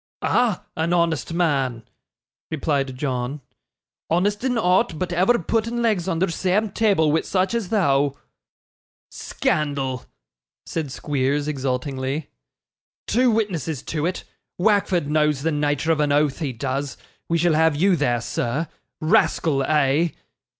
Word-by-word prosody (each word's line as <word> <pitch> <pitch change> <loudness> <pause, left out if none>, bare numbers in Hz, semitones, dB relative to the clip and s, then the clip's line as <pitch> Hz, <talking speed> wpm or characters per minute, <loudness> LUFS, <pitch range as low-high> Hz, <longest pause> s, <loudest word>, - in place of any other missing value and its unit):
'Ah! 235 -7 +1
an 165 +2 0
honest 170 -2 +1
man,' 135 -9 0 0.7
replied 140 -4 -1
John; 130 0 -2 0.7
'honest 205 +6 +1
in 255 -2 +1
ought 185 -3 +2
but 180 +2 -3
ever 190 +8 +3
putting 230 +5 -1
legs 205 -6 +1
under 180 0 +1
seame 190 +4 0
table 195 -9 +3
wi' 160 - +2
such 190 +3 0
as 230 -6 -2
thou.' 140 -9 +2 1.0
'Scandal!' 135 -4 -2 0.6
said 155 -5 -4
Squeers, 145 +1 -1
exultingly. 135 +1 -3 0.7
'Two 250 +3 +3
witnesses 175 - -1
to 155 0 -2
it; 180 - -3 0.3
Wackford 190 -4 +2
knows 150 -2 +1
the 165 - +1
nature 145 +1 0
of 160 - +1
an 150 -1 +2
oath, 145 -1 +2
he 145 -5 -2
does; 135 +3 -3 0.3
we 170 - +2
shall 170 0 +2
have 160 0 +3
you 185 +5 +3
there, 120 -7 0
sir. 125 +6 -2 0.3
Rascal, 155 -4 +2
eh? 150 +2 +2
160 Hz, 130 wpm, -22 LUFS, 140-185 Hz, 1.0 s, ever